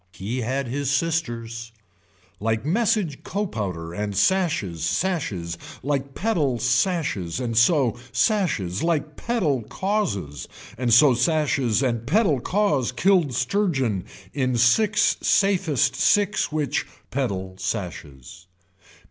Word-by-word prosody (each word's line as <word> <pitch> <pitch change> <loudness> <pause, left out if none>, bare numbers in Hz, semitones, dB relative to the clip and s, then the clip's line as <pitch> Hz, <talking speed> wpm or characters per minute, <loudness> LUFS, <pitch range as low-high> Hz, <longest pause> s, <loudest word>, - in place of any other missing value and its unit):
He 115 +7 -4
had 130 +3 -2
his 140 +2 -2
sisters. 120 -7 -2 0.7
Like 110 +3 -1
message 190 - 0
copowder 100 - -4
and 105 +1 -3
sashes 150 - +1
sashes, 90 - -2 0.2
like 140 0 -2
pedal 160 - 0
sashes 125 - 0
and 120 -3 -3
so 120 0 +4 0.2
sashes, 140 - 0
like 155 -3 -1
pedal 170 - 0
causes 110 - -3 0.3
and 120 0 -1
so 130 +4 +7
sashes, 135 -3 +1
and 115 -3 -1
pedal 165 - +3
cause 150 - +1
killed 155 0 +2
surgeon 130 - 0 0.3
in 130 -4 0
six 210 - +3
safest 190 - +2
six 205 -5 +2
which, 150 -4 -1 0.2
pedal 95 -8 -2
sashes. 85 - -6
130 Hz, 105 wpm, -24 LUFS, 110-170 Hz, 0.7 s, so